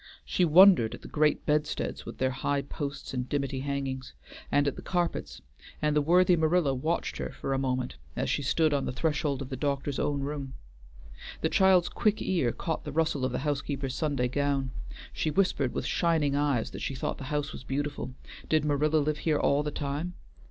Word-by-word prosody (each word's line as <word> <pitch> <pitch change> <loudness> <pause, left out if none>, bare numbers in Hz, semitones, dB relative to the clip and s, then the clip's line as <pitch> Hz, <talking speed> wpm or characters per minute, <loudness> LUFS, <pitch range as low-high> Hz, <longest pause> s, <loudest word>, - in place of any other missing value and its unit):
She 180 - +2
wondered 175 - +7
at - - -15
the - - -8
great 150 0 +1
bedsteads 150 0 -1
with - - -7
their 130 0 +1
high 140 +2 -1
posts 140 -1 -5
and 125 -1 -3
dimity 140 -2 -1
hangings, 135 -1 -3 0.4
and 145 0 +3
at 140 - 0
the - - -8
carpets, 165 - -2 0.4
and 150 -1 +1
the 150 - +4
worthy 180 +4 +5
Marilla 160 -3 +2
watched 155 +6 -1
her - - -3
for 135 - -4
a 135 - 0
moment 130 - -2 0.2
as - - -1
she - - 0
stood 155 +3 +2
on 140 -1 0
the - - -2
threshold 145 0 -1
of 130 - -9
the 135 - -3
doctor's 140 0 -2
own 145 -1 0
room. 140 -2 -4 0.9
The - - +1
child's 190 -2 +5
quick 215 -1 +1
ear 165 -11 +1
caught 160 +6 -3
the 150 - -5
rustle 155 -3 0
of 130 - +1
the 125 - -1
housekeeper's 140 -2 -2
Sunday 140 -5 0
gown; 140 0 0 0.4
she 155 - -1
whispered 150 -7 +1
with - - -3
shining 160 -5 +1
eyes 140 -5 +1
that - - -7
she 135 - -3
thought - - -3
the 135 - -6
house 145 +1 -2
was - - -8
beautiful. 140 -1 -3 0.3
Did 155 -1 +3
Marilla 150 +1 +2
live 150 0 0
here 155 -2 +1
all 140 0 +2
the 150 - -2
time? 150 +5 -3
145 Hz, 200 wpm, -29 LUFS, 135-155 Hz, 0.9 s, wondered